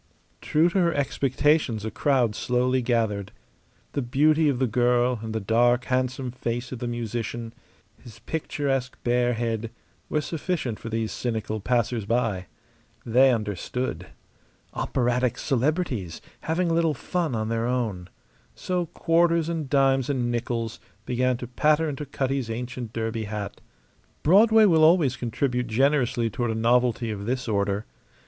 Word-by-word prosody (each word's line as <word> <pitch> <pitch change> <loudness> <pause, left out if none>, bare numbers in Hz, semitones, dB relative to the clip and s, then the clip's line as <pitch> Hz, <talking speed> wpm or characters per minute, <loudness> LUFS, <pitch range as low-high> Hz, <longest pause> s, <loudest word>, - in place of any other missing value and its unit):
True 155 +3 +3
to 190 - 0
her 170 -2 +2
expectations 135 -3 +1
a 110 - -3
crowd 125 -1 +2
slowly 125 +3 +1
gathered. 110 -5 0 0.6
The 140 - -2
beauty 150 +5 +3
of 135 - 0
the 130 - +2
girl 120 +1 +2
and 110 0 -5
the 110 - -1
dark, 120 +4 +2
handsome 130 0 -1
face 120 0 -4
of 130 - -5
the 120 - -3
musician, 115 0 -4 0.5
his 115 -3 -13
picturesque 135 -1 -2
bare 120 0 +2
head, 115 -1 -2 0.4
were 150 - +1
sufficient 155 - -3
for 115 - -7
these 115 -1 -2
cynical 110 -2 -3
passers 120 0 0
by. 110 -5 0 0.6
They 130 +3 +5
understood. 110 +3 -3 0.7
Operatic 125 -1 0
celebrities, 135 - -1 0.2
having 170 +2 0
a - - +2
little 165 -2 +2
fun 165 -1 -2
on 110 0 -2
their 115 0 0
own. 110 -8 -2 0.5
So 180 -2 -2
quarters 165 0 +2
and 160 -5 -3
dimes 135 -2 +3
and 125 -4 0
nickels 115 -1 -3 0.3
began 125 0 +1
to 125 - -6
patter 150 +6 +2
into 145 0 -5
Cutty's 135 -2 -2
ancient 120 0 -5
derby 115 -1 -3
hat. 105 -1 -5 0.6
Broadway 215 +6 +6
will 165 -5 +4
always 155 -6 +5
contribute 125 +1 -1
generously 125 0 +2
toward 120 +2 -2
a 110 - -1
novelty 120 0 +2
of 100 0 -5
this 125 0 -2
order. 100 -1 0
125 Hz, 145 wpm, -25 LUFS, 115-140 Hz, 0.7 s, Broadway